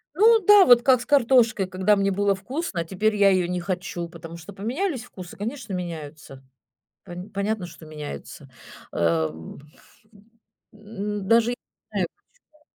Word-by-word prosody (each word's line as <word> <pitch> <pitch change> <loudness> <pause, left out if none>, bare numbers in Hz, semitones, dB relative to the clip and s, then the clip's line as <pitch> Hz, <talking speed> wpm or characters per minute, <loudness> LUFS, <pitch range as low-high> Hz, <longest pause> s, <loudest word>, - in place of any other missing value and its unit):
Ну 445 +5 +6
да, 415 -1 +8
вот 245 -1 +7
как 255 -1 +4
с - - -7
картошкой, 235 -7 +3
когда 190 +3 +2
мне 195 0 +1
было 200 +1 +1
вкусно, 200 - -4
теперь 205 +5 0
я 200 -1 +5
её 185 -2 +2
не 180 0 -2
хочу, 180 -2 -4
потому 165 0 -10
что 170 +5 -11
поменялись 255 - -3
вкусы, 185 -7 -11
конечно, 225 +1 -5
меняются, 155 -6 -7 0.6
пон 180 +1 -9
понятно, 200 -1 -2
что 175 -2 -13
меняются. 150 -2 -9 0.4
Э, 80 -2 +1 1.4
м, 210 -1 -6
даже 230 +2 +4
не - - -3 0.4
знаю - - -1 0.4
почему. 305 0 -31
200 Hz, 145 wpm, -24 LUFS, 175-235 Hz, 1.4 s, да